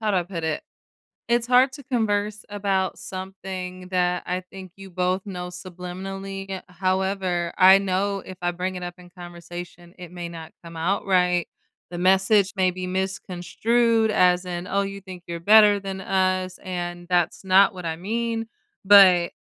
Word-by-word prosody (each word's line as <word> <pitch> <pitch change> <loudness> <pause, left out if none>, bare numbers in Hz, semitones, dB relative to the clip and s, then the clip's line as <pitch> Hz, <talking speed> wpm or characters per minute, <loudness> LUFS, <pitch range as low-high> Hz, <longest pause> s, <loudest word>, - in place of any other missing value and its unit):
how 215 -1 0
do - - +2
I 180 - +2
put 170 -2 -6
it? 160 -1 -2 0.7
It's 235 0 +1
hard 255 +2 +5
to 280 - -10
converse 210 -4 -1
about 195 -2 -1
something 185 -1 -7
that 180 -1 +1
I 180 +1 -2
think 190 -2 -10
you 195 -1 -11
both 185 +1 -1
know 180 -3 -5
subliminally, 190 +2 -7
eh, 190 -1 -4
however, 185 -1 -1
I 190 +1 +8
know 195 +1 -1
if 185 -1 -9
I 175 0 0
bring 185 +1 -4
it 180 - -6
up 175 0 -5
in 180 -1 -15
conversation, 175 0 -10
it 180 -2 -10
may 175 -1 -6
not 165 -2 -9
come 165 -1 -10
out 185 +6 -1
right. 180 -2 +2 0.4
The 175 - -5
message 190 +2 +3
may 185 -1 +2
be 180 0 -5
misconstrued 210 +5 0
as 180 -1 +3
in, 175 0 -5
"Oh, 200 +1 +1
you 195 0 -6
think 185 -2 -10
you're 170 0 -5
better 210 +1 +6
than 195 -1 -6
us," 185 -1 0
and 175 -1 -5
that's 175 +1 +1
not 190 +1 +5
what 180 -2 -8
I 160 -1 -2
mean. 225 +5 -3 0.4
But, 190 -3 +7
185 Hz, 175 wpm, -24 LUFS, 180-195 Hz, 0.7 s, I